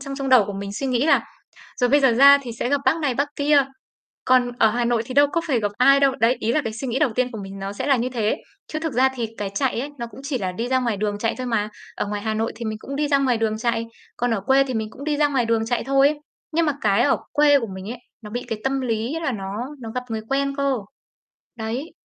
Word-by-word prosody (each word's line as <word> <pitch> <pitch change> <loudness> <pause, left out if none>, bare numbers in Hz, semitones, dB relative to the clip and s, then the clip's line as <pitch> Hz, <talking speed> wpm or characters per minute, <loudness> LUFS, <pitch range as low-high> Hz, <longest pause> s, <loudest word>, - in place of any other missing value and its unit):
trong 275 0 -6
trong 275 -1 -3
đầu 255 -5 +6
của 205 - -5
mình 200 0 -5
suy 270 +7 -3
nghĩ 255 +2 +1
là - - +4 0.6
"Rồi 245 - +3
bây 290 +1 +5
giờ 265 -3 +4
ra 280 +4 +8
thì 240 -3 -6
sẽ 235 - -3
gặp 285 +1 +1
bác - - +3
này 285 -6 0
bác 280 +3 0
kia, 285 -1 +4 0.6
còn 250 -1 +3
ở 220 - +5
Hà 240 +2 -1
Nội 235 -1 +1
thì 255 - -6
đâu 285 +1 +6
có 335 - +1
phải 255 -6 +2
gặp 205 -1 -1
ai 275 +2 +6
đâu." 275 -1 +3
Đấy, 235 +3 +4
ý 230 - 0
là 305 - +2
cái 225 - -3
suy 240 +4 -5
nghĩ 245 +2 -1
đầu 290 -3 +2
tiên 250 +1 0
của 220 - -6
mình 195 0 -8
nó 195 +1 -4
sẽ 205 - -4
là 275 -2 +4
như 245 +1 -1
thế, 225 -4 0 0.3
chứ 310 - -4
thực 320 -1 -3
ra 255 +2 +4
thì 240 -3 -2
cái 205 -2 -3
chạy 260 -1 0
ấy, 280 +3 -5
nó 235 - -4
cũng 260 - -12
chỉ 275 -2 -2
là 185 -4 -3
đi 230 +6 -3
ra 260 0 +2
ngoài 235 -4 -1
đường 205 0 -2
chạy 225 +2 0
thôi 255 - -4
mà, 215 -3 0 0.3
ở - - -2
ngoài 205 0 -3
Hà 220 0 -1
Nội 225 +1 -1
thì 235 - -6
mình 215 -1 -3
cũng 275 +5 -7
đi 295 0 0
ra 280 -1 +4
ngoài 260 -3 +2
đường 220 -1 0
chạy, 230 -1 -1 0.3
còn 245 0 0
ở 205 - -2
quê 265 +6 +3
thì 260 -2 -4
mình 220 -1 -2
cũng 275 - -10
đi 300 -1 0
ra 295 0 +3
ngoài 265 -4 +1
đường 225 -1 +1
chạy 245 +1 -1
thôi, 275 +3 +3 0.3
nhưng 330 +1 +2
mà 300 - +2
cái 210 +2 +3
ở 280 - +3 0.2
quê 290 -1 +5
của 235 - -3
mình 190 +3 -7
ấy, 245 - -6 0.2
nó 210 - -9
bị 245 +3 -3
cái 225 -2 -3
tâm 270 0 0
lý 235 +1 -2
là 315 - 0
nó 200 -4 -5 0.4
nó 225 -2 -7
gặp 250 - -2
người 220 -1 -3
quen 275 0 0
cơ. 280 -1 +1 0.8
Đấy. 235 +8 -4
250 Hz, 295 wpm, -22 LUFS, 225-275 Hz, 0.8 s, ra